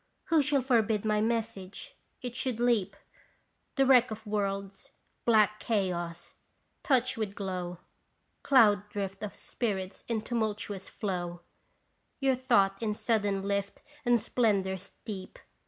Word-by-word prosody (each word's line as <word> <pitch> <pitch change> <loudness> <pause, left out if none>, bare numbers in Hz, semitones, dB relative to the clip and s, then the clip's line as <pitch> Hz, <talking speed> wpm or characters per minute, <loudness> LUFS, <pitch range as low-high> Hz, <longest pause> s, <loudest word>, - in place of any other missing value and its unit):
Who 325 -3 +5
shall 280 -1 +2
forbid 220 -4 +2
my 210 -1 +2
message? 220 -4 -3 0.3
It 245 -1 -4
should 255 -3 -2
leap 235 -5 +2 0.8
The 270 -2 +4
wreck 255 -2 +6
of 220 0 -7
worlds, 200 -2 -3 0.3
black 215 -2 +4
chaos, 175 -6 -2 0.5
touch 255 -2 +2
with 210 -3 -3
glow 180 -3 -4 0.6
Cloud 210 -6 +5
drift 195 -2 -4
of 210 - -5
spirits 195 -5 -3
in 225 -2 -1
tumultuous 210 -4 -3
flow, 175 -3 -4 0.8
Your 270 -1 +3
thought 215 -6 +2
in 215 -2 -1
sudden 205 -4 0
lift 200 0 -2 0.2
and 240 -2 +4
splendor 205 -4 +1
steep 190 +1 -8
210 Hz, 125 wpm, -30 LUFS, 195-235 Hz, 0.8 s, wreck